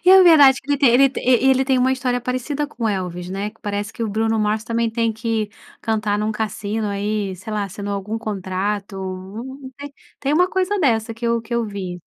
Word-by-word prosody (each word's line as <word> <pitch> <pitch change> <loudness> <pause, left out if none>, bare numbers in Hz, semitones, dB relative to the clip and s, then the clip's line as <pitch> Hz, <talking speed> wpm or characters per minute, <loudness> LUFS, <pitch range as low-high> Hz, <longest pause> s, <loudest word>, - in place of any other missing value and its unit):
E 365 - +7
é 380 0 +9
verdade 290 -7 +8
que 285 +2 -1
ele 260 +3 +5
ele 260 +1 +3
tem 260 -1 +2
uma 260 +1 +3
história 250 -1 -1
parecida 255 +4 -2
com 245 -5 -6
o - - +3
Elvis, 180 -3 -3
né, 200 +2 -3
que 225 - -28
parece 205 +1 -3
que 230 - -5
o 225 - -1
Bruno 220 +2 0
Mars 215 +1 +1
também 230 0 0
tem 230 0 0
que 220 -1 -2 0.3
cantar 215 -2 0
em - - -1
um 215 - 0
cassino 215 0 -2
aí, 200 -1 -2
sei 215 +4 -8
lá, 210 -1 0
assinou 200 +1 -5
algum 205 +3 -3
contrato, 200 -1 -3 1.2
tem 280 +1 0
uma 355 +4 +4
coisa 380 +2 0
dessa 230 -7 +1
que 230 +1 -4
eu 235 0 +1
que 235 +1 -5
eu 235 -1 +1
vi. 190 -4 -5
225 Hz, 205 wpm, -21 LUFS, 205-255 Hz, 1.2 s, é